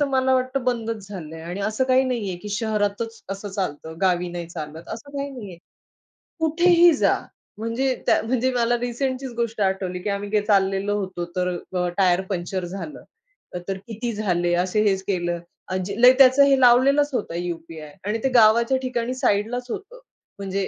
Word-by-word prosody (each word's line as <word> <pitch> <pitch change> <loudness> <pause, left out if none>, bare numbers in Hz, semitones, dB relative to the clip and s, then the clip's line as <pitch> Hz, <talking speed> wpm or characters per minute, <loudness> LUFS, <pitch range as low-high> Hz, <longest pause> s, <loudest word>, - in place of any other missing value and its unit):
तर - - +4
मला 260 -1 +1
वाटतं 255 +1 0
बंदच 225 -4 -2
झालंय 160 -5 -8
आणि 175 +4 -5
असं 215 +5 0
काही 260 +1 +4
नाहीये, 225 -8 -2
की 210 +4 -9
शहरातच 215 +1 -2
असं 195 +1 -5
चालतं 160 -5 -4
गावी 180 -2 +2
नाही 175 -1 -5
चालत 160 0 -8
असं 285 +6 -9
काही 280 0 -3
नाहीये. 210 -10 -9 0.8
कुठेही 345 +2 +5
जा. 280 - +3 0.4
म्हणजे 235 +4 -1
त्या - - +3
म्हणजे 255 +2 0
मला 240 0 +2
रिसेंटचीच 255 +2 -3
गोष्ट 230 -2 -2
आठवली, 190 -2 -1
की 205 - -4
आम्ही 200 0 -3
गे 210 0 +2
काय 205 - -6
चाललेलो 195 0 +2
होतो, 185 -3 -4
तर 180 0 0 0.2
अ, 180 -1 0
टायर 185 -2 +3
पंक्चर 185 -1 -3
झालं, 175 -3 -7 0.6
तर 195 - -2
किती 230 +1 -4
झाले 175 -5 0
असे 210 +3 0
हेच 190 -1 -1
केलं. 175 -3 -1 0.3
आजी 185 +4 -3
लय 250 +1 +9
त्याचं 270 +1 +7
हे 275 -1 +4
लावलेलंच 270 +4 +5
होतं 170 - -2
यू-पी-आय 165 -3 -6
आणि 210 +2 0
ते 265 - +2
गावाच्या 235 +3 +5
ठिकाणी 250 -1 -2
साइडलाच 245 -1 0
होतं. 455 - -7 0.4
म्हणजे 195 -1 -2
210 Hz, 170 wpm, -23 LUFS, 185-255 Hz, 0.8 s, लय